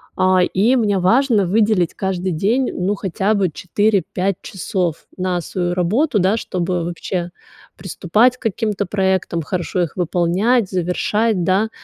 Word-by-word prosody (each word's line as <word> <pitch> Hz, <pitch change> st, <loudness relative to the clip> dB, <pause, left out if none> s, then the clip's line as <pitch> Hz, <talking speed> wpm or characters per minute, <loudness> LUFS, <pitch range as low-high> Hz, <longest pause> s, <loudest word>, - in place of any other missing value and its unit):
А, 185 Hz, 0 st, +3 dB
и 215 Hz, +8 st, +2 dB
мне 205 Hz, -5 st, +1 dB
важно 225 Hz, +2 st, +3 dB
выделить 205 Hz, -3 st, +2 dB
каждый 190 Hz, -1 st, -2 dB
день, 225 Hz, +11 st, 0 dB
ну, 190 Hz, +3 st, -1 dB
хотя 195 Hz, +2 st, -1 dB
бы 195 Hz, -4 st, +1 dB
4-5 195 Hz, +2 st, 0 dB
часов 180 Hz, -4 st, -3 dB
на 180 Hz, -1 st, -1 dB
свою 175 Hz, +1 st, -2 dB
работу, 210 Hz, -, +1 dB
да, 195 Hz, +4 st, +2 dB
чтобы 180 Hz, -3 st, -2 dB
вообще 175 Hz, +1 st, -4 dB, 0.4 s
приступать 210 Hz, +7 st, +1 dB
к -, -, -42 dB
каким-то 210 Hz, -2 st, -1 dB
проектам, 190 Hz, -3 st, 0 dB
хорошо 175 Hz, +3 st, -2 dB
их 170 Hz, -, -3 dB
выполнять, 185 Hz, +6 st, +1 dB
завершать, 185 Hz, +3 st, 0 dB
да. 195 Hz, +5 st, +1 dB
190 Hz, 135 wpm, -19 LUFS, 180-215 Hz, 0.4 s, А